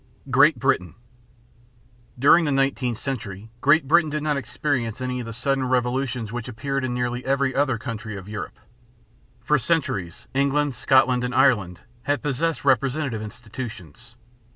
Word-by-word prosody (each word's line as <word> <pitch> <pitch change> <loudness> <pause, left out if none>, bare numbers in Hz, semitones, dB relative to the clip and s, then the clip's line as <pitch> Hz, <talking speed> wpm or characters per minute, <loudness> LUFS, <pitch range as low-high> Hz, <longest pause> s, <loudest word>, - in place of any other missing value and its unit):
GREAT 145 +2 +5
BRITAIN. 115 -8 0 1.2
During 150 +6 +5
the 145 - 0
nineteenth 135 -3 0
century 110 -6 -5
Great 150 +1 +4
Britain 160 +1 +4
did 150 0 -3
not 150 -1 +1
experience 130 -3 -2
any 125 0 -3
of 120 - -6
the - - -5
sudden 135 +4 -1
revolutions 125 -2 -1
which 120 0 -5
appeared 135 +3 -3
in 125 -1 -2
nearly 125 0 -2
every 135 0 +1
other 135 -3 +1
country 110 -4 -6
of 95 0 -10
Europe. 105 -1 -6 0.9
For 150 +3 +2
centuries 115 - -2
England, 140 +1 +1
Scotland, 125 0 +3
and 125 +1 -3
Ireland 105 - +3 0.2
had 145 +4 -1
possessed 150 +2 -1
representative 135 -2 +1
institutions. 115 - -9
130 Hz, 145 wpm, -24 LUFS, 115-140 Hz, 1.2 s, GREAT